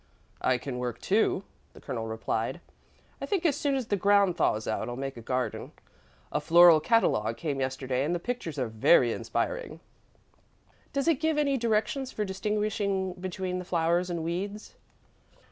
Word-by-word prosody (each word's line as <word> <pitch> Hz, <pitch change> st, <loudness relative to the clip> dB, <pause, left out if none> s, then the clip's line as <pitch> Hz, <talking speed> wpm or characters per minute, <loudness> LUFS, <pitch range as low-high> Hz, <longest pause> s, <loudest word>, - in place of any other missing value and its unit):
"I 130 Hz, -, +2 dB
can 125 Hz, 0 st, -5 dB
work, 120 Hz, -1 st, -3 dB
too," 200 Hz, -1 st, +1 dB, 0.3 s
the -, -, -14 dB
Colonel 115 Hz, -2 st, -4 dB
replied. 110 Hz, +5 st, -2 dB, 0.6 s
"I -, -, -3 dB
think 385 Hz, -5 st, -1 dB
as 300 Hz, -5 st, +3 dB
soon 285 Hz, -2 st, 0 dB
as 260 Hz, -3 st, -1 dB
the 205 Hz, -, 0 dB
ground 200 Hz, -1 st, +3 dB
thaws 110 Hz, -9 st, 0 dB
out, 110 Hz, -, -2 dB
I'll 120 Hz, -, -4 dB
make 135 Hz, +1 st, -4 dB
a 120 Hz, -, -9 dB
garden. 125 Hz, +2 st, -3 dB, 0.6 s
A -, -, -1 dB
floral 170 Hz, -1 st, +7 dB
catalogue 115 Hz, -, +2 dB
came 145 Hz, -5 st, -3 dB
yesterday 130 Hz, 0 st, -1 dB
and 165 Hz, +5 st, 0 dB
the -, -, -2 dB
pictures 170 Hz, -, -4 dB
are 130 Hz, -3 st, 0 dB
very 115 Hz, +3 st, +4 dB
inspiring." -, -, -3 dB, 1.1 s
"Does 280 Hz, 0 st, -1 dB
it 325 Hz, -5 st, +3 dB
give 315 Hz, -1 st, +1 dB
any 285 Hz, -2 st, +2 dB
directions 235 Hz, +2 st, 0 dB
for 210 Hz, -, -2 dB
distinguishing 200 Hz, -1 st, -1 dB
between 185 Hz, 0 st, -4 dB
the -, -, -5 dB
flowers 175 Hz, 0 st, +1 dB
and 170 Hz, -2 st, -3 dB
weeds?" 195 Hz, +6 st, -4 dB
180 Hz, 165 wpm, -28 LUFS, 130-215 Hz, 1.1 s, floral